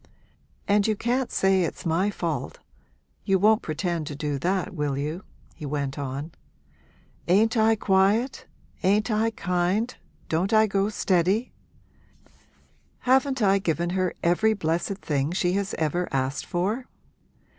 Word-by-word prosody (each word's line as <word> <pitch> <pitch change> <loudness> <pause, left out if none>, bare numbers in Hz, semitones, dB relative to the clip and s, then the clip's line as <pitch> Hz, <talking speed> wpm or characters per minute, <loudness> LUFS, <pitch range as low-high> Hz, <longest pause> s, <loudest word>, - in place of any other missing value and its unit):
'And 205 0 +3
you 215 - +1
can't 245 +4 -1
say 190 -1 +3
it's 170 - -3
my 170 +5 +1
fault - - -3 0.7
you 195 -2 +2
won't 215 +3 +4
pretend 165 0 -2
to 145 - -5
do 145 -1 -2
that, 185 +4 -1
will 145 -4 -2
you?' 155 +6 -3 0.3
he - - -12
went 140 -1 -3
on. 140 +3 -4 1.0
'Ain't 215 +6 +3
I 220 0 +4
quiet, 205 +5 +1 0.3
ain't 210 +4 +2
I 220 +1 +2
kind, 195 +3 -1 0.3
don't 180 +6 0
I 220 0 +6
go 195 0 0
steady? 195 +3 +1 1.5
Haven't 265 -1 +2
I 195 0 +4
given 170 -1 -1
her 185 -1 -1
every 215 +6 +3
blessed 175 +2 -1
thing 145 -3 -1
she 180 -1 +1
has 195 0 -1
ever 170 +3 -1
asked 135 0 -2
for?' 210 +9 -1
190 Hz, 135 wpm, -25 LUFS, 165-215 Hz, 1.5 s, I